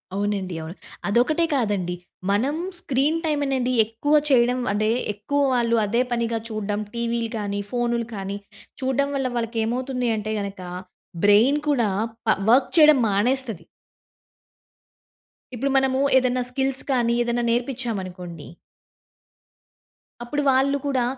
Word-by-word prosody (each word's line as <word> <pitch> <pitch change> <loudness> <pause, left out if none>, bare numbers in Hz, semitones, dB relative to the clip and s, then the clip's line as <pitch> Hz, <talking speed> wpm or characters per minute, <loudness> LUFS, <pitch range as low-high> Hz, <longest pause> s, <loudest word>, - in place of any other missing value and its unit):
అవునండి. 200 -3 -2
అవును. 160 +3 -8 0.3
అదొక్కటే 255 +11 +2
కాదండి 205 -8 0 0.4
మనం 250 +9 +1 0.2
స్క్రీన్ 290 +2 0
టైమ్ 300 -2 0
అనేది 255 -2 0
ఎక్కువ 225 +7 -2 0.2
చేయడం 250 -1 +3
అంటే, 215 +1 +1 0.2
ఎక్కువ 245 +8 -1
వాళ్ళు 235 -2 +2
అదే 235 +4 +1
పనిగా 235 -1 0
చూడ్డం 210 -1 -2 0.2
టీవీలు 235 -1 -1
కానీ, 205 -1 -3
ఫోన్‌లు 235 -1 0
కానీ 195 0 -4 0.4
చూడ్డం 265 +2 +1
వల్ల 270 -1 0
వాళ్ళకి 230 0 -2
ఏమవుతుంది 250 +1 -1
అంటే 215 +1 -3
గనక, 200 -2 -5 0.6
బ్రైన్ 225 +8 +5
కూడా 240 -7 +2 0.4
ప 220 - +4
వర్క్ 255 +3 +5
చేయడం 305 -3 +8
మానేస్తది. 225 -2 0 1.9
ఇప్పుడు 275 +4 -1
మనము 265 0 +2 0.2
ఏదైనా 255 -1 +1
స్కిల్స్ 270 +1 0
కానీ 240 -3 +2
ఏదైనా 240 0 0
నేర్పించామనుకోండి. 200 - -4 1.7
అప్పుడు 290 +5 -2
వాళ్ళు 270 +2 +2
కూడా 260 -3 +1
240 Hz, 120 wpm, -23 LUFS, 210-265 Hz, 1.9 s, చేయడం